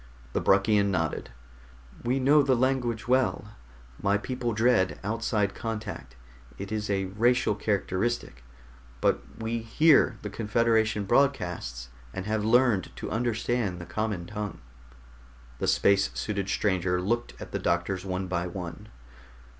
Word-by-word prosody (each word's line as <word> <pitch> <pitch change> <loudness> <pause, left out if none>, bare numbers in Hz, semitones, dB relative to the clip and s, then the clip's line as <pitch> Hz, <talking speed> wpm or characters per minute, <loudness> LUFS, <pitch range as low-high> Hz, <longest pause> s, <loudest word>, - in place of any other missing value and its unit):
The - - 0
Bruckian 100 +1 +4
nodded. 80 -5 -1 0.7
"We 125 +3 +1
know 145 +3 +5
the 135 -2 +3
language 120 -2 0
well. 125 -4 +1 0.5
My 100 +1 +2
people 125 +2 -3
dread 110 -4 +2
outside 105 -1 0
contact 105 - -6 0.4
it 100 +1 -7
is 105 -1 -2
a 95 -1 0
racial 115 +5 +2
characteristic 100 - -2 0.6
but - - +2 0.2
we 115 +1 -2
hear 130 +1 +4
the 105 - -4
Confederation 110 -1 +1
broadcasts 90 - 0 0.3
and 95 - -4
have 110 0 -1
learned 115 -4 +3
to - - -6
understand 115 -3 -1
the 85 - -7
common 105 -5 -3
tongue." 105 +3 -5 1.0
The - - -1
space 100 0 +3
suited 100 -2 -2
stranger 95 -3 +1
looked 120 +6 -2
at - - -9
the - - -2
doctors 90 +2 0
one 95 -1 -3
by 90 -1 -2
one. 85 -2 -7
105 Hz, 130 wpm, -27 LUFS, 95-120 Hz, 1.0 s, know